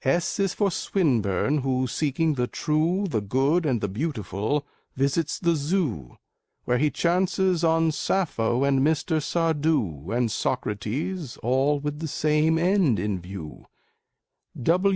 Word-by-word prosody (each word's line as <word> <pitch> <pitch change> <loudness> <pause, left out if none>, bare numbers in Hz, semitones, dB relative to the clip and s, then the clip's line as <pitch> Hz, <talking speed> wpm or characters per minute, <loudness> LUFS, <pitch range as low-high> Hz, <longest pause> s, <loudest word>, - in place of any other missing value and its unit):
S 165 +9 0
is 195 -2 +1
for 200 -2 +1
Swinburne, 140 - +1
who, 130 -1 0
seeking 155 +4 0
the 125 -3 -1
true, 165 +8 0
The 115 - -1
good, 135 - +1
and 120 -6 0
the - - 0
beautiful, 110 - -2 0.3
visits 140 +4 0
the 170 -4 +1
Zoo, 145 - -2 0.5
Where 125 0 +1
he 150 +2 +3
chances 180 +1 +1
on 165 0 +3
Sappho 140 -8 0
and 140 -1 +3
Mr. 155 +2 +1
Sardou, 150 - 0
And 120 -1 +1
Socrates, 125 - -3
all 135 +5 +2
with 150 +1 -4
the 160 - -3
same 155 +2 +2
end 175 - +3
in 95 0 -2
view. 90 -4 -9
145 Hz, 130 wpm, -25 LUFS, 120-165 Hz, 0.5 s, he